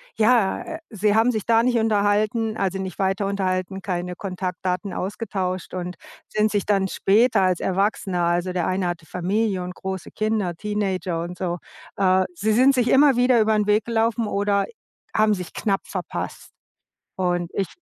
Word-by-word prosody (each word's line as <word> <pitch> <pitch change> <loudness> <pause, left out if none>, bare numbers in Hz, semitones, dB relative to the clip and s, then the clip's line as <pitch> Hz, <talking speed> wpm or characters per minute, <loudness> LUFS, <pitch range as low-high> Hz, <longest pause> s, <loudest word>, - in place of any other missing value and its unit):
ja, 220 -3 +3
äh, 325 -1 -6
sie 210 -1 +1
haben 225 +3 +4
sich 215 -4 -3
da 230 -1 +4
nicht 245 -1 +2
unterhalten, 215 +1 +1
also 190 0 -1
nicht 190 -2 -5
weiter 195 +1 0
unterhalten, 190 -1 -2
keine 180 -2 -3
Kontaktdaten 185 +1 -3
ausgetauscht 190 -2 -3
und 180 0 -4 0.3
sind 215 0 +1
sich 205 -2 0
dann 195 -2 +2
später 215 +3 +3
als 185 -2 +2
Erwachsener, 190 -2 0
also 175 +2 +1
der 175 -2 0
eine 185 0 0
hatte 175 -2 -4
Familie 190 +4 -1
und 180 0 -6
große 190 -2 -5
Kinder, 215 -5 -1
Teenager 190 -3 -2
und 175 +1 -6
so. 175 -1 -2 0.4
Äh, 185 -1 +3
sie 205 +6 0
sind 260 +5 +5
sich 250 -2 +1
immer 280 0 +6
wieder 245 0 +4
über'n 215 -1 +2
Weg 210 0 +3
gelaufen 230 0 +1
oder 200 0 +1 0.5
haben 215 0 +3
sich 180 -2 -7
knapp 200 -3 0
verpasst. - - -5 0.7
Und 175 -2 0
ich 195 -2 0
195 Hz, 165 wpm, -23 LUFS, 185-215 Hz, 0.7 s, immer